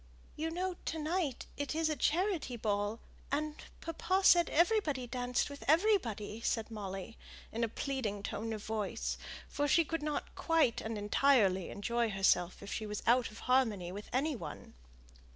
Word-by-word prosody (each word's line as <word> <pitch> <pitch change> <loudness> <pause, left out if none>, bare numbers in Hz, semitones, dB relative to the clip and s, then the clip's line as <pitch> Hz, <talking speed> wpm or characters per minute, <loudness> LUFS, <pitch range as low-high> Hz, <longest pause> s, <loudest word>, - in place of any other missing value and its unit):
You 320 +2 -2
know 360 +2 -2
to 320 - -2
night 310 -3 -1
it 285 +1 -2
is 325 0 +2
a 310 - 0
charity 330 - 0
ball, 205 0 -1 0.3
and 300 +2 0 0.3
papa 370 +4 0
said 345 -2 +7
everybody 330 - +2
danced 245 0 -1
with 285 -1 -9
everybody," 275 - +2
said 225 -1 -1
Molly, 195 0 -6 0.3
in 230 +1 -2
a - - +3
pleading 220 -6 -3
tone 225 +2 -3
of 215 -2 -4
voice; 215 -2 -2 0.3
for 290 0 -1
she 330 +3 +4
could 330 +1 -2
not 300 0 -3
quite 325 -8 +2
thoroughly 210 -2 +2
enjoy 235 +3 0
herself 190 -2 +2
if 200 - -5
she 215 - -3
was 210 0 -4
out 240 0 +4
of 215 - -12
harmony 225 -9 +2
with 205 +3 -8
any 285 +4 +1
one. 160 -10 -8
245 Hz, 160 wpm, -33 LUFS, 210-310 Hz, 0.3 s, said